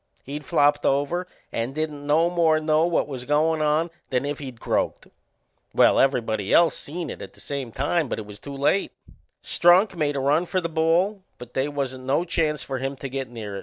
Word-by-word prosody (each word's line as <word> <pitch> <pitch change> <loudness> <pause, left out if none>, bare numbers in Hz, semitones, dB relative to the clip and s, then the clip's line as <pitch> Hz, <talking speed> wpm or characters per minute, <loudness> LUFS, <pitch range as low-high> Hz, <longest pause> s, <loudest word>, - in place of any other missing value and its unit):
He'd 145 +2 -6
flopped 145 -2 +2
over 145 +7 0 0.2
and 120 +4 -3
didn't 150 -2 -4
no 160 +3 +4
more 165 -3 +3
know 155 +1 +2
what 170 - +1
was 130 -4 -6
goin' 155 +3 +2
on 155 +3 +1 0.2
than 130 +1 0
if 145 0 -3
he'd 130 -5 -8
croaked. - - -1 0.7
Well, - - +5
everybody 115 -7 +1
else 170 -1 +5
seen 165 +2 -5
it - - -9
at - - -9
the - - -20
same 140 -4 -5
time; 145 +4 0
but - - -2
it 110 - -6
was 105 0 -11
too 140 -1 -8
late. 145 +8 +1 0.5
Strunk 180 +4 +4
made 150 -3 0
a - - 0
run 150 +6 +2
for 185 - 0
the 170 -2 -3
ball, 170 +5 +1 0.2
but 125 0 -11
they 135 +1 0
wasn't 135 -3 -4
no 140 +6 +2
chance 160 -3 -1
for 130 - -4
him 135 +2 -3
to 135 0 -6
get 135 -1 -4
near 105 -4 -6
it. - - -5
145 Hz, 210 wpm, -24 LUFS, 135-165 Hz, 0.7 s, Well